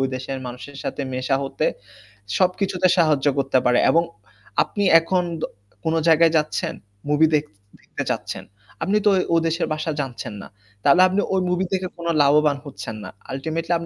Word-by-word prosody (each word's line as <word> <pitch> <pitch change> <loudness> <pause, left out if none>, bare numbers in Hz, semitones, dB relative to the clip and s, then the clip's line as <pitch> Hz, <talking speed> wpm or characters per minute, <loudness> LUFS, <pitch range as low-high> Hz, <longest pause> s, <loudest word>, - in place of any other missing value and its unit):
দেশের 130 +1 -5
মানুষের 125 +3 -8
সাথে 145 - -3
মেশা 130 +1 0
হতে, 135 - -2 0.7
সবকিছুতে 185 0 +1
সাহায্য 150 -4 +3
করতে 135 -1 +2
পারে। 125 0 +4
এবং 165 +1 +4 0.6
আপনি 205 - -3 0.2
এখন 180 +2 0 0.2
দ - - -4 0.4
কোন 160 0 0
জায়গায় 165 0 +5
যাচ্ছেন, 150 0 -1 0.4
মুভি 155 +2 +4
দেখতে 145 -9 -3 0.2
দেখতে - - -6
চাচ্ছেন, - - -3 0.4
আপনি 200 +5 +2
তো - - +7
ও - - +2 0.2
ও - - +5
দেশের 165 +2 -1
ভাষা 155 +1 -2
জানছেন 125 -4 -6
না, - - -10 0.4
তাহলে 175 +6 +6
আপনি 195 +2 +1
ওই 190 - +2
মুভি 180 +1 0
দেখে 185 -1 -1
কোন 170 0 -6
লাভবান 145 0 +4
হচ্ছেন 110 -4 -7
না। - - -7 0.2
আল্টিমেটলি 160 +5 -2
155 Hz, 165 wpm, -22 LUFS, 135-175 Hz, 0.7 s, তো